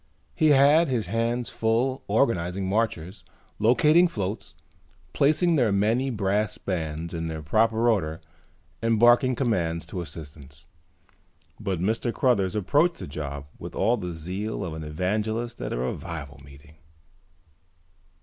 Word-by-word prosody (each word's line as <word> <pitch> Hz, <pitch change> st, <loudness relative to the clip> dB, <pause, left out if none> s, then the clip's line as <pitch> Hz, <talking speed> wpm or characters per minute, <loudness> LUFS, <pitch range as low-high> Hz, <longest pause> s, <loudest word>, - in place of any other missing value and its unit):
He 155 Hz, -, +2 dB
had 145 Hz, +4 st, +5 dB
his 125 Hz, -5 st, -1 dB
hands 115 Hz, +1 st, -1 dB
full 120 Hz, +4 st, 0 dB
organizing 95 Hz, -6 st, 0 dB
marchers, 95 Hz, -3 st, -2 dB, 0.4 s
locating 150 Hz, +10 st, +5 dB
floats, 105 Hz, -, -5 dB, 0.6 s
placing 155 Hz, +4 st, +3 dB
the 120 Hz, -6 st, +3 dB
many 110 Hz, +7 st, +1 dB
brass 105 Hz, -2 st, -1 dB
bands 80 Hz, -2 st, -4 dB
in 80 Hz, -1 st, -3 dB
their 80 Hz, -1 st, -5 dB
proper 110 Hz, +8 st, +2 dB
order 80 Hz, -9 st, +1 dB, 0.6 s
and 115 Hz, -1 st, +1 dB
barking 120 Hz, +2 st, +5 dB
commands 85 Hz, -10 st, -1 dB
to 90 Hz, -, -5 dB
assistants. 70 Hz, -3 st, -11 dB, 0.9 s
But 95 Hz, -5 st, -2 dB
Mr. 115 Hz, +5 st, 0 dB
Cruthers 105 Hz, -8 st, +1 dB
approached 145 Hz, -, +2 dB
the -, -, -7 dB
job 70 Hz, -1 st, -6 dB
with -, -, -8 dB
all 115 Hz, +5 st, +2 dB
the 90 Hz, -6 st, -5 dB
zeal 95 Hz, +6 st, -4 dB
of 85 Hz, -, -5 dB
an 80 Hz, 0 st, -6 dB
evangelist 110 Hz, +9 st, -2 dB
at -, -, -4 dB
a -, -, -2 dB
revival 70 Hz, +2 st, -5 dB
meeting. 70 Hz, +3 st, -16 dB
105 Hz, 130 wpm, -25 LUFS, 80-120 Hz, 0.9 s, had